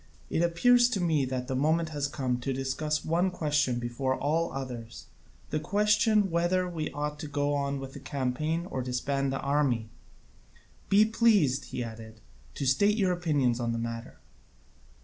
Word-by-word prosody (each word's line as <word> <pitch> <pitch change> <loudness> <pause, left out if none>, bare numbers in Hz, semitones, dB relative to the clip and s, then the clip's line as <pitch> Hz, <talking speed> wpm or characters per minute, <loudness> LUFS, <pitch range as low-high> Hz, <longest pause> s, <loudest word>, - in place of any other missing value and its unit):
It - - +1
appears 240 +9 +4
to 215 - -1
me 160 -6 +2
that 125 -1 -3
the 130 - -2
moment 160 +4 +1
has 145 -2 -2
come 130 -3 -2
to 135 +2 -3
discuss 135 +3 -2
one 170 +4 +2
question 150 -7 0
before 120 +2 -1
all 160 +5 0
others, 125 -4 -7 0.5
the - - 0
question 210 +3 +2
whether 175 +2 +1
we 160 -3 -3
ought 150 0 -4
to 155 - -5
go 145 0 0
on 140 -1 -1
with 135 0 -8
the - - -8
campaign 140 +5 -2
or 130 - -2
disband 135 +2 -1
the 135 - -2
army. 140 -6 +1 1.0
Be 205 +2 +6
pleased," 210 - +3
he 125 - -4
added, 110 -1 -9 0.4
"to 140 - -3
state 200 +11 +3
your 190 -4 +2
opinions 145 -9 +1
on 120 -1 -1
the - - -2
matter." 115 0 -5
145 Hz, 170 wpm, -29 LUFS, 130-170 Hz, 1.0 s, Be